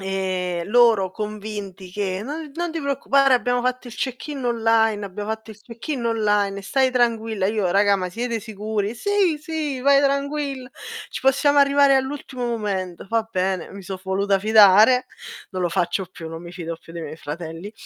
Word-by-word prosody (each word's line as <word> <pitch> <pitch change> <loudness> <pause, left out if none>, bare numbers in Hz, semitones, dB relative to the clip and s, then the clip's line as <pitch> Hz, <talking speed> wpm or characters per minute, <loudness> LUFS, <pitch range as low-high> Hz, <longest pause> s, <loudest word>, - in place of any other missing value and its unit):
ehm, 185 -2 -2
loro 225 -4 +4
convinti 205 -2 -6
che: 190 0 -2
"No 300 +3 -6
non 345 0 -3
ti 325 - -3
preoccupare, 275 -1 +3
abbiamo 245 0 +1
fatto 255 0 -2
il 230 - -10
check-in 270 +2 -4
online, 225 -3 +2
abbiamo 205 +2 -6
fatto 220 0 -5
il 210 -1 -13
check-in 240 +3 -5
online, 205 -3 +1
stai 260 +6 +2
tranquilla". 225 -5 +1
Io: 205 -3 0
"Raga, 200 +2 +4
ma 185 -1 -3
siete 230 +4 -3
sicuri?", 215 0 -3
"Sì, 395 - +1
sì, 305 -4 -3
vai 275 +1 +5
tranquilla, 280 -1 -1 0.4
ci - - -5
possiamo 285 +2 +3
arrivare 280 -1 +5
all'ultimo 265 -2 -3
momento". 200 -6 -3
Va 225 -1 0
bene, 185 -2 -1
mi 200 0 -9
so 190 +1 -6
voluta 195 +1 0
fidare. 215 +4 +6 0.5
Non 185 -1 -4
lo 175 - +1
faccio 180 +1 -1
più, 165 -3 -9
non 165 +1 -8
mi 170 - -9
fido 170 -2 -5
più 165 - -14
dei 170 - -5
miei 155 0 -7
fratelli. 165 +6 -7
220 Hz, 170 wpm, -22 LUFS, 190-260 Hz, 0.5 s, fidare